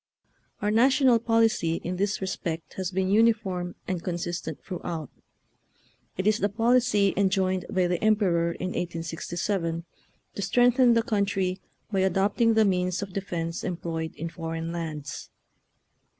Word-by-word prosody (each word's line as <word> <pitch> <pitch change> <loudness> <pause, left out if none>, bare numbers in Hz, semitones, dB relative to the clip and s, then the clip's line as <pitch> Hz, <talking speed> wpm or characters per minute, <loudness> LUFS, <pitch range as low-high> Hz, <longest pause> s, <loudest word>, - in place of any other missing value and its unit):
Our 210 - +2
national 255 +1 +5
policy 225 -7 +2
in 180 +1 -3
this 200 +2 -1
re - - -1
spect 165 -3 -4
has 185 -2 -3
been 190 0 0
uniform 205 -5 +2
and 180 -3 -2
consistent 175 -1 -4
throughout; 170 -5 -5 1.1
it 190 - -2
is 215 +1 +3
the 205 - +1
policy 225 -2 +3
enjoined 190 -1 +1
by 185 -1 +1
the 175 +1 -1
Emperor 185 -6 +3
in 185 - -4
1867, 170 0 -3 0.5
to - - -5
strengthen 245 +4 +4
the 230 - +3
country 195 -4 0
" - - -41
by 195 - +1
adopting 200 +5 +2
the 220 -1 +5
means 180 0 0
of 195 -2 -8
de 195 - -1
fence 170 -3 -4
employed 165 -2 -4
in 165 +2 -4
foreign 165 -1 -4
lands." 155 -5 -5
190 Hz, 145 wpm, -27 LUFS, 170-210 Hz, 1.1 s, national